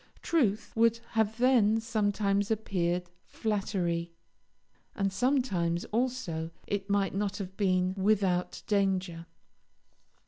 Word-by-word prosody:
Truth 220 -11 +1
would 230 0 +3 0.4
then 240 -4 +4
have 225 - -1
sometimes 205 -2 0
appeared 180 -5 -1 0.2
flattery, 180 -6 -2 0.8
and 195 -1 0
sometimes, 190 -8 +1
also, 225 -9 -1 0.2
it 200 0 -3
might 200 -1 +1
not 200 0 -1
have 190 -2 -6
been 185 -2 +1
without 190 -3 +1
danger. 190 -5 0
200 Hz, 100 wpm, -30 LUFS, 185-220 Hz, 0.8 s, then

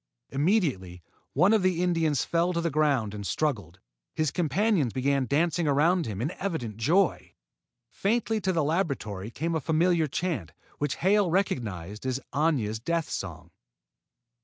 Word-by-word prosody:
Immediately 135 - 0 0.3
one 180 +9 +4
of 220 - +4
the 180 -2 +1
Indians 165 -5 +1
fell 170 +2 +1
to 170 - 0
the 170 -1 -1
ground 140 -8 +1
and 105 -1 -6
struggled. 100 - -2 0.4
His 155 -3 0
companions 175 - +1
began 135 0 +1
dancing 165 +4 +1
around 160 +3 +3
him 105 0 -3
in 150 - -1
evident 155 - -3
joy. 165 - +1 0.5
Faintly 220 +1 0
to 190 - +1
the 165 -4 +1
laboratory 140 - -2
came 165 +7 -3
a 160 - 0
familiar 165 +1 +2
chant, 145 - -3 0.3
which 145 -2 -1
Hale 200 0 +3
recognized 110 - -2
as 130 0 -1
Aña's 135 -9 +1
death 165 +6 -2
song. 85 -2 -6
155 Hz, 145 wpm, -27 LUFS, 115-175 Hz, 0.5 s, one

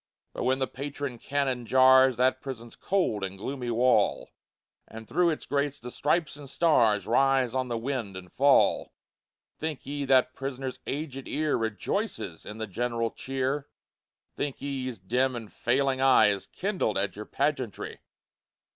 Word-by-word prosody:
But - - -3
when 130 +1 +2
the 135 - 0
patron 140 -2 -6
cannon 135 -3 -1
jars 130 -1 +6
That 130 +1 +2
prison's 120 -4 -7
cold 180 - 0
and 95 0 -4
gloomy 125 +4 -4
wall, 120 +2 +2 0.6
And 110 0 -10
through 175 +1 +2
its 155 - -3
grates 145 0 -1
the 125 +1 -8
stripes 150 +3 0
and 145 -2 -10
stars 120 -11 +3
Rise 130 +1 +3
on 130 -1 -1
the 120 -1 -2
wind, 115 -5 -3
and 90 -2 -11
fall, 140 +1 +3 0.7
Think 155 -3 -4
ye 145 +1 -3
that 130 -1 +4
prisoner's 135 -1 -5
aged 135 -2 -4
ear 150 0 0
Rejoices 110 - -3
in 105 - -7
the 110 - -3
general 115 +2 -2
cheer? 135 +2 -2 0.7
Think 145 -2 -3
ye 135 -2 -3
his 125 -3 -5
dim 125 +7 0
and 115 -3 -8
failing 130 +1 +1
eye 130 -5 +6
Is 100 -1 -2
kindled 185 - -1
at 95 -2 -1
your 105 +1 -7
pageantry? 135 -7 -2
130 Hz, 155 wpm, -28 LUFS, 115-140 Hz, 0.7 s, jars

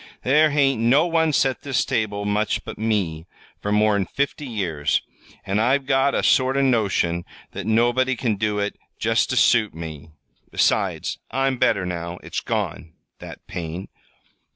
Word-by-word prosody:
"There 150 +4 +4
hain't 135 -5 +2
no 135 +8 +4
one 165 -2 +2
set 135 -2 +1
this 140 -4 0
table 100 -2 -1
much 105 +1 0
but - - -8
me 95 -7 -1 0.3
for 105 - -2
more'n 105 -2 +2
fifty 140 - -2
years, 85 - -1 0.4
an' 100 +2 0
I've 130 +5 +2
got 135 +1 +2
a - - 0
sort 130 +1 +3
of 140 - +3
notion 100 -9 +1 0.3
that 100 +1 -6
nobody 120 +4 +2
can 115 -2 -1
do 105 +1 -1
it 100 0 -2 0.2
just 115 +1 +1
ter 130 - -1
suit 110 -6 +3
me. 80 -2 -8 0.4
Besides, - - 0
I'm 135 -1 0
better 95 - +2
now. 85 -1 -4
It's - - -3
gone 80 - -3 0.3
that - - -11
pain." 85 +2 -6
110 Hz, 155 wpm, -22 LUFS, 95-135 Hz, 0.4 s, There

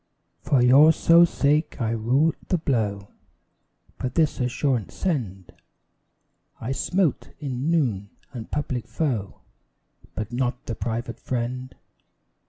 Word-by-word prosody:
For 130 -4 +2
your 140 +6 +7
sole 170 +1 +6
sake 150 +1 0
I 115 -2 0
rue 125 +8 +2
the 180 - +1
blow, 105 -10 -1 0.9
But 125 -1 -4
this 155 -2 +2
assurance 125 -2 -1
send: 105 - -3 1.1
I 115 - -4
smote, 175 +3 0
in 135 0 -3
noon, 120 - 0 0.2
the 115 -3 -6
public 135 -5 -3
foe, 120 -11 -3 0.7
But 110 +2 -5
not 125 0 -2
the 115 - -4
private 115 +1 -4
friend. 125 +1 -4
125 Hz, 115 wpm, -24 LUFS, 115-150 Hz, 1.1 s, your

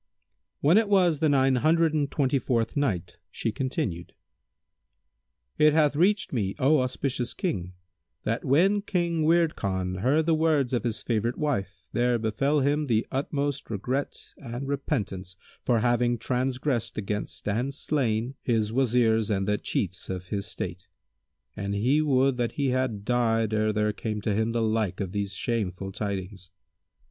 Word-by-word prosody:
When 165 +9 +6
it 220 -2 -1
was 180 -6 +4
the 155 -1 +3
Nine 135 -2 +3
Hundred 160 +3 +3
and 145 -2 0
Twenty 135 -1 +1
fourth 115 -2 -1
Night, 120 - -1
She 115 - -2
continued: 130 - -3 1.4
It 150 -1 +6
hath 150 -2 +3
reached 190 +4 +2
me, 100 -6 -1
O 145 +3 +4
auspicious 130 -1 -2
King, 90 - -3 0.5
that - - -1
when 190 +10 +3
King 170 -5 -1
Wird 165 0 +3
Khan 95 -2 -2
heard 140 +9 +2
the 165 - +3
words 155 -5 +2
of 120 - 0
his 115 -2 -2
favourite 115 +1 -1
wife 100 - -2
there 120 +1 +2
befel 135 +7 +1
him 145 +2 +1
the 115 -2 +2
utmost 140 0 -2
regret 125 +6 -2 0.2
and 125 +1 -6
repentance 100 - -3 0.3
for 120 -3 +2
having 120 0 +2
transgressed 125 +1 -1
against 105 0 -4
and 120 +6 0
slain 130 -4 -1
his 110 -3 0
Wazirs 115 -3 +2
and 95 -2 0
the 105 0 +1
chiefs 90 -3 -3
of 90 -1 -5
his 100 -1 -3
state, - - -6 0.7
and 100 +1 -3
he 130 +9 +2
would 135 -3 +2
that 120 -2 -1
he 140 -2 0
had 125 -5 -1
died 115 -2 +1
ere 110 0 +2
there 105 0 0
came 105 0 -3
to 105 +1 0
him 110 +2 0
the 115 0 0
like 110 -4 0
of 95 -3 -3
these 100 0 -3
shameful 95 -4 -2
tidings. 95 -2 -5
120 Hz, 155 wpm, -27 LUFS, 105-145 Hz, 1.4 s, When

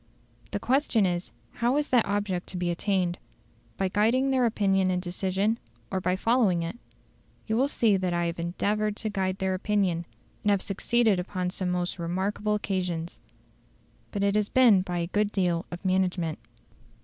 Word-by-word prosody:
The - - -3
question 250 -3 +2
is, 175 -1 -2 0.2
how 240 +4 +1
is 295 0 0
that 240 -5 +4
object 200 -3 -1
to 185 - -6
be 175 -1 0
attained? 180 -1 0 0.6
By 190 - +1
guiding 230 +8 +2
their 255 -2 +3
opinion 195 -4 +2
and 180 -1 +1
decision, 190 +4 -1 0.3
or 190 - -1
by 180 0 +1
following 205 -5 +2
it? 170 +8 -5 0.7
You 220 - -1
will 260 +4 +3
see 225 -7 +2
that 185 -1 -1
I 175 0 0
have 170 0 -3
endeavoured 205 +5 -1
to 215 0 -3
guide 190 -2 -1
their 190 -1 0
opinion, 185 -3 0 0.4
and 210 - +2
have 200 -1 +4
succeeded 215 0 +2
upon 180 0 -3
some 185 -1 -2
most 180 0 -2
remarkable 195 +5 -1
occasions. 180 -5 -3 0.9
But 200 -2 -2
it 200 0 +2
has 210 0 +1
been 235 -7 +6
by 180 -1 -3
a 170 - 0
good 205 +4 0
deal 175 -4 0
of 175 +2 -8
management. 180 -3 0
190 Hz, 175 wpm, -27 LUFS, 180-210 Hz, 0.9 s, been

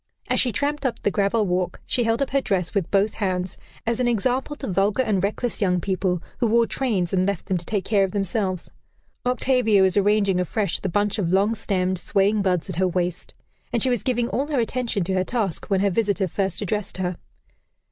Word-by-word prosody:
As - - +3
she 250 - +2
tramped 290 +6 -1
up 260 -3 0
the 205 - +2
gravel 205 +2 +1
walk, 180 -1 -1
she 245 -2 0
held 225 +4 +2
up - - -5
her 275 0 +2
dress 185 -7 -1
with 190 -5 0
both 200 +1 +2
hands, 185 -2 -2 0.3
as 230 +1 0
an 250 - +2
example 250 +5 0
to 285 - -6
vulgar 200 +4 +1
and 205 -6 0
reckless 220 +4 -2
young 180 -3 +2
people 185 -1 -1 0.2
who 240 - +2
wore 230 +1 +4
trains 210 -10 -1
and 185 0 +2
left 200 -3 -2
them 190 - 0
to 170 - -6
take 200 -2 -1
care 205 -3 +3
of 195 - 0
themselves. 195 -2 -2 0.6
Octavia 250 -5 +3
was 190 -1 +3
arranging 200 -2 +3
afresh 195 +3 -1
the 190 - -3
bunch 205 +4 0
of 175 -4 0
long 200 +4 +3
stemmed, 185 -4 -1
swaying 200 +3 +2
buds 180 -4 0
at 185 -4 -6
her 185 0 +3
waist, 180 -1 -2 0.4
and 235 - +1
she 260 - +2
was 240 -5 0
giving 240 -2 0
all 275 +3 -1
her 290 -4 0
attention 235 -4 -1
to 190 +2 -2
her 185 0 +2
task 205 -5 -2
when 195 -2 +1
her 200 0 +2
visitor 200 -1 +1
first 190 +2 -1
addressed 205 0 -2
her. 180 -2 -2
200 Hz, 220 wpm, -23 LUFS, 185-230 Hz, 0.6 s, wore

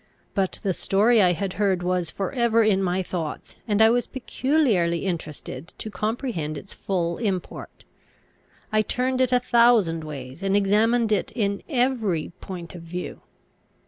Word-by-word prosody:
But 190 -2 -1
the 190 - +1
story 215 +6 +3
I 180 -2 +5
had 190 +2 -3
heard 190 -3 +2
was 180 -2 0
for 195 +4 -3
ever 235 -3 +3
in 200 -3 +3
my 185 0 0
thoughts, 165 -4 -5
and 215 0 +4
I 220 - +6
was 245 0 +1
peculiarly 245 - +1
interested 165 -2 -5
to 215 - -6
comprehend 215 - -2
its 190 - -9
full 170 -3 -2
import. 195 -6 -4 0.9
I 215 0 +3
turned 255 +3 0
it 255 -1 +2
a 250 - +4
thousand 235 -10 +3
ways, 140 0 -8
and 195 0 +1
examined 220 +3 +2
it 210 - +1
in 200 -4 -1
every 240 - 0
point 175 -3 -7
of 175 - -9
view. 175 +2 -6
195 Hz, 155 wpm, -24 LUFS, 175-230 Hz, 0.9 s, I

